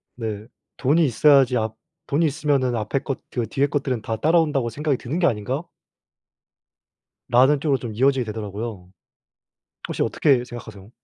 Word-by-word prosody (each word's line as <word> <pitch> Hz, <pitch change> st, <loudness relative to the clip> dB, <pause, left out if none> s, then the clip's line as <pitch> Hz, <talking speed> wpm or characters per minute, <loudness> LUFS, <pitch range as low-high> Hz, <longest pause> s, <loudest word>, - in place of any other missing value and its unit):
네. 110 Hz, -2 st, -5 dB, 0.3 s
'돈이 155 Hz, +5 st, +3 dB
있어야지 135 Hz, -1 st, +4 dB
앞 110 Hz, -1 st, -2 dB, 0.3 s
돈이 155 Hz, +3 st, +2 dB
있으면 140 Hz, -4 st, +1 dB
앞에 110 Hz, +4 st, -1 dB
것 135 Hz, -1 st, -5 dB
그 120 Hz, -3 st, -2 dB
뒤에 140 Hz, +1 st, +1 dB
것들은 135 Hz, -5 st, -2 dB
다 110 Hz, +1 st, -3 dB
따라온다고 150 Hz, -4 st, +2 dB
생각이 145 Hz, +3 st, -1 dB
드는 140 Hz, +9 st, -4 dB
게 180 Hz, -, +2 dB
아닌가?' 120 Hz, +8 st, -2 dB, 1.7 s
라는 135 Hz, +4 st, +5 dB
쪽으로 140 Hz, -3 st, +1 dB
좀 120 Hz, -3 st, -6 dB
이어지게 130 Hz, +2 st, +2 dB
되더라고요. 105 Hz, -2 st, -6 dB, 1.0 s
혹시 -, -, -2 dB
어떻게 135 Hz, -5 st, +2 dB
생각하세요? 110 Hz, -4 st, -10 dB
130 Hz, 335 characters per minute, -23 LUFS, 110-145 Hz, 1.7 s, 라는